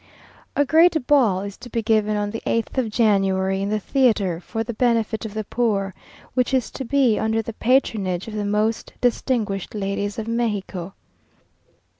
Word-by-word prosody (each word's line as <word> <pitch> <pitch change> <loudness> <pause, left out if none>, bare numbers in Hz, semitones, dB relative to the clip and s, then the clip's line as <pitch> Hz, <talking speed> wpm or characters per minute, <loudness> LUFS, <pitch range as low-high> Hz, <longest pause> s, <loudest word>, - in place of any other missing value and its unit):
A 285 - +3
great 320 -1 +4
ball 240 -11 +3
is 200 0 -7
to 245 - -11
be 230 -2 -2
given 215 -1 +2
on 205 0 -1
the 225 - -5
8th 230 +3 0
of 240 -4 0
January, 195 -3 +2
in 200 - -1
the 215 0 0
theatre, 210 -8 +1
for 225 +5 -4
the 235 +1 -5
benefit 225 -2 0
of 215 -1 -7
the 215 - -2
poor, 200 -4 -1 0.4
which 250 +1 +1
is 255 - 0
to 270 - -5
be 260 -3 +2
under 220 0 0
the 230 - -6
patronage 215 -7 +1
of 220 - -7
the 210 -1 -2
most 210 +2 -1
distinguished 225 -6 -1
ladies 200 0 -2
of 220 -1 -4
Mexico. 205 -6 -2
220 Hz, 175 wpm, -22 LUFS, 200-240 Hz, 0.4 s, great